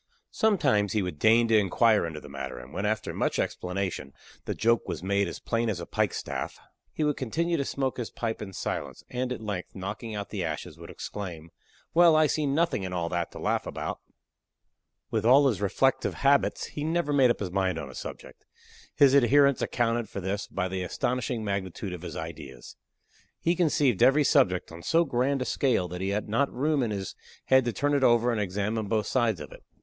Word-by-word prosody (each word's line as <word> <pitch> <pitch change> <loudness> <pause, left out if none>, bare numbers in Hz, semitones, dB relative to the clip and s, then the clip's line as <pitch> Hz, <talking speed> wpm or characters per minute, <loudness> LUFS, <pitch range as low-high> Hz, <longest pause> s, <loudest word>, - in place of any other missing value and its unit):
Sometimes 105 - +2
he 105 -3 +1
would 90 -5 -5
deign 115 +2 +5
to 115 - +4
inquire 105 -1 +3
into 80 -2 -6
the 75 - -12
matter, 70 -2 -6
and 60 +2 -11
when, 100 +3 -1
after 110 0 -2
much - - -1
explanation, 90 -6 -3 0.3
the - - -3
joke 115 +1 +2
was - - -4
made 100 0 +1
as 85 - -6
plain 115 0 -1
as 100 -5 -2
a 85 - -5
pike - - 0
staff, - - -4 0.3
he 155 - -2
would 150 -1 +1
continue 170 +7 -1
to 140 - 0
smoke 135 -1 -2
his 120 -3 -4
pipe 115 -1 -4
in 100 -2 -6
silence, - - -4
and 125 0 -2
at 125 - -4
length, 100 -4 -5
knocking 105 +4 -5
out 100 -1 -5
the - - -2
ashes, - - -4
would - - -10
exclaim, 85 -6 -7 0.4
"Well, 170 -1 +6
I 155 0 +5
see 150 0 0
nothing 160 -3 +1
in 95 -1 -4
all 85 -2 -1
that 85 -1 -2
to - - -9
laugh - - -1
about." - - -4 1.1
With 110 -2 0
all 135 +5 +6
his 105 -7 0
reflective 135 +6 +1
habits, 140 0 +2
he 145 - -6
never 160 -1 0
made 135 -3 +5
up 120 - +1
his 95 -4 -4
mind 95 -2 0
on 70 -4 -6
a - - -13
subject. - - -9 0.5
His 140 -2 +6
adherents 140 +1 +5
accounted 115 -2 0
for - - -5
this 100 +2 -3
by 95 -1 -2
the 95 0 -3
astonishing 120 +4 -2
magnitude 100 -1 -3
of 90 - -7
his 90 - -7
ideas. 80 -6 -8 0.6
He 170 +1 +1
conceived 145 - +2
every 145 +3 +6
subject 130 - +2
on 85 0 -9
so 165 - +2
grand 135 0 0
a - - -7
scale 125 -11 +1
that 90 +1 -6
he 95 - -1
had 100 +1 -2
not 125 +7 +1
room 145 +3 +1
in 120 - 0
his 100 -3 -4 0.3
head 130 -1 +4
to 120 - 0
turn 145 +4 0
it 140 -2 +2
over 120 0 +4
and 110 -3 0
examine 105 +3 -2
both 110 0 0
sides 115 -8 +1
of - - -9
it. - - -13
110 Hz, 210 wpm, -27 LUFS, 95-135 Hz, 1.1 s, Well